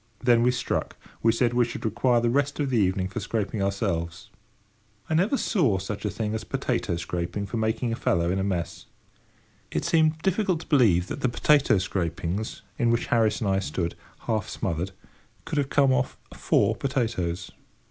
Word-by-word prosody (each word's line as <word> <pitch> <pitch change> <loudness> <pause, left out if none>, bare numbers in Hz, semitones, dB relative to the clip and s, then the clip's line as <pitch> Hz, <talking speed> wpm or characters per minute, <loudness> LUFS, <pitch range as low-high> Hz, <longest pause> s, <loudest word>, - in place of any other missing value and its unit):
Then 120 0 +3
we 120 - +4
struck. 125 - -2 0.2
We 115 - +4
said 120 +1 +1
we 120 0 +4
should 120 -1 -5
require 120 +2 +2
the 120 0 +1
rest 140 +3 0
of 140 -2 0
the 120 - +2
evening 95 -1 +1
for 100 - -5
scraping 105 -1 -2
ourselves. 95 -4 -2 0.8
I - - -2
never 195 - +2
saw 145 - +2
such 100 +3 -5
a - - +1
thing 105 +1 -3
as 110 - -3
potato - - -1
scraping 85 +3 -3
for 115 - -4
making 110 +2 0
a - - -1
fellow 85 -5 +1
in 95 - 0
a - - 0
mess. 90 -4 -3 0.8
It - - -2
seemed 160 -1 +3
difficult 190 -3 +1
to - - -11
believe 105 - +4
that - - -6
the 130 - +2
potato 140 0 +3
scrapings 95 +3 -3 0.2
in 120 - +3
which 115 0 +1
Harris 110 -2 +2
and 105 - 0
I 95 - +2
stood, 85 -1 -2 0.3
half 110 -3 -1
smothered, 90 0 -2 0.6
could 150 - -1
have 140 -1 0
come 140 -2 +4
off 125 0 0 0.2
four - - +2
potatoes. 105 -10 -2
110 Hz, 185 wpm, -26 LUFS, 95-125 Hz, 0.8 s, we